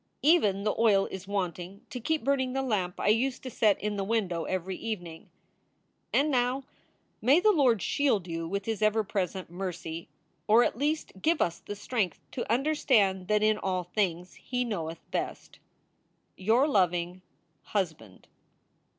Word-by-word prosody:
Even 210 Hz, -, +4 dB
the 210 Hz, -, +1 dB
oil 205 Hz, -4 st, +4 dB
is 190 Hz, 0 st, -7 dB
wanting 195 Hz, +1 st, -4 dB
to 250 Hz, -, -4 dB
keep 310 Hz, +4 st, -1 dB
burning 260 Hz, -1 st, +1 dB
the 270 Hz, 0 st, -1 dB
lamp 190 Hz, -8 st, -1 dB
I -, -, +1 dB
used 250 Hz, +4 st, +1 dB
to 255 Hz, -, -6 dB
set 215 Hz, -3 st, +3 dB
in 210 Hz, 0 st, -2 dB
the 195 Hz, -, -1 dB
window 195 Hz, -6 st, -1 dB
every 185 Hz, 0 st, -2 dB
evening. 175 Hz, -8 st, -6 dB, 0.8 s
And 295 Hz, +2 st, +2 dB
now 250 Hz, +1 st, +1 dB, 0.6 s
may 270 Hz, +8 st, +5 dB
the 430 Hz, +3 st, +5 dB
Lord 255 Hz, -, +3 dB
shield 225 Hz, -11 st, +1 dB
you 165 Hz, -1 st, -4 dB
with 200 Hz, +3 st, -3 dB
his 220 Hz, -1 st, -2 dB
ever 215 Hz, +1 st, +3 dB
present 190 Hz, -3 st, -3 dB
mercy, 175 Hz, -3 st, -5 dB, 0.4 s
or 225 Hz, +3 st, +6 dB
at -, -, 0 dB
least 300 Hz, +5 st, -1 dB
give 325 Hz, -1 st, +2 dB
us 170 Hz, -1 st, 0 dB
the 205 Hz, -, -7 dB
strength 205 Hz, -4 st, -2 dB
to 240 Hz, -, -4 dB
understand 230 Hz, -9 st, +2 dB
that 210 Hz, 0 st, +2 dB
in 215 Hz, 0 st, +3 dB
all 185 Hz, -1 st, -1 dB
things 180 Hz, -1 st, -2 dB
he 250 Hz, -1 st, -3 dB
knowcth 165 Hz, -8 st, -3 dB
best. -, -, -4 dB, 0.8 s
Your 225 Hz, +9 st, +3 dB
loving 180 Hz, -, +1 dB, 0.4 s
HUSBAND. 160 Hz, -, -4 dB
210 Hz, 160 wpm, -29 LUFS, 185-250 Hz, 0.8 s, or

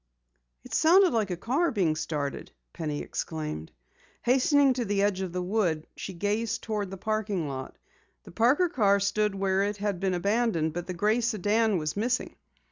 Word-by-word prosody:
"It -, -, -11 dB
sounded 360 Hz, +2 st, +5 dB
like 220 Hz, -4 st, +1 dB
a 180 Hz, -, -3 dB
car 270 Hz, -, +1 dB
being 185 Hz, -, +1 dB
started!" 145 Hz, -3 st, -4 dB, 0.2 s
Penny 150 Hz, -3 st, -3 dB
exclaimed. 150 Hz, -, -5 dB, 0.5 s
Hastening 270 Hz, +2 st, +4 dB
to 250 Hz, -1 st, -2 dB
the 200 Hz, -2 st, 0 dB
edge 200 Hz, -2 st, +1 dB
of 185 Hz, -2 st, -3 dB
the 180 Hz, +1 st, -3 dB
woods, 180 Hz, -5 st, 0 dB
she 195 Hz, -, -6 dB
gazed 215 Hz, +5 st, -1 dB
toward 210 Hz, -3 st, -2 dB
the 195 Hz, -, -7 dB
parking 210 Hz, -5 st, -2 dB
lot. 130 Hz, -1 st, -6 dB, 0.5 s
The -, -, -13 dB
Parker 250 Hz, -, +3 dB
car 205 Hz, -, +3 dB
stood 205 Hz, +1 st, 0 dB
where 195 Hz, 0 st, +1 dB
it 205 Hz, +1 st, -1 dB
had 205 Hz, -3 st, -2 dB
been 190 Hz, -1 st, 0 dB
abandoned, 200 Hz, -4 st, +1 dB
but 175 Hz, +1 st, -5 dB
the 185 Hz, -, -4 dB
gray 215 Hz, +6 st, +2 dB
sedan 220 Hz, -1 st, +1 dB
was 155 Hz, -2 st, -2 dB
missing. 240 Hz, +5 st, -1 dB
205 Hz, 175 wpm, -28 LUFS, 175-225 Hz, 0.5 s, sounded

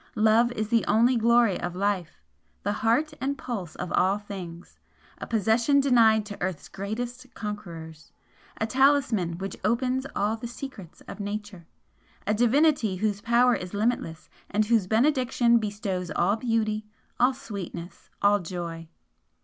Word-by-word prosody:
Love 220 Hz, +3 st, +4 dB
is 215 Hz, -2 st, -3 dB
the 230 Hz, -1 st, +3 dB
only 235 Hz, +4 st, +4 dB
glory 235 Hz, -3 st, +3 dB
of 175 Hz, 0 st, -4 dB
Life, 185 Hz, -, -2 dB, 0.4 s
the 205 Hz, -, 0 dB
Heart 235 Hz, +9 st, +1 dB
and 280 Hz, +1 st, -1 dB
Pulse 200 Hz, -11 st, -5 dB
of 180 Hz, -, -5 dB
all 190 Hz, +2 st, +3 dB
things, 185 Hz, -5 st, -9 dB, 0.4 s
a -, -, -6 dB
possession 230 Hz, +6 st, +3 dB
denied 230 Hz, -6 st, +4 dB
to 205 Hz, -1 st, -9 dB
earth's 180 Hz, -4 st, -3 dB
greatest 240 Hz, +6 st, -5 dB
conquerors 165 Hz, -8 st, -7 dB, 0.5 s
a 220 Hz, -, +1 dB
talisman 250 Hz, -9 st, +2 dB
which 195 Hz, +1 st, -5 dB
opens 255 Hz, +5 st, 0 dB
all 210 Hz, +2 st, +1 dB
the 230 Hz, +1 st, -6 dB
secrets 235 Hz, -, -9 dB
of 200 Hz, -, -10 dB
Nature 205 Hz, -4 st, -6 dB, 0.6 s
a 210 Hz, -, +1 dB
Divinity 245 Hz, -1 st, +3 dB
whose 205 Hz, +1 st, -1 dB
power 240 Hz, +2 st, +4 dB
is 180 Hz, -1 st, -4 dB
limitless, 205 Hz, -7 st, -1 dB, 0.2 s
and 215 Hz, +1 st, +1 dB
whose 220 Hz, -4 st, +2 dB
benediction 240 Hz, 0 st, +3 dB
bestows 205 Hz, -4 st, -3 dB
all 175 Hz, +6 st, +1 dB
beauty, 220 Hz, -2 st, -1 dB, 0.3 s
all 255 Hz, +2 st, +4 dB
sweetness, 185 Hz, -7 st, -8 dB
all 205 Hz, 0 st, +5 dB
joy! 170 Hz, -2 st, -6 dB
215 Hz, 140 wpm, -26 LUFS, 190-240 Hz, 0.6 s, all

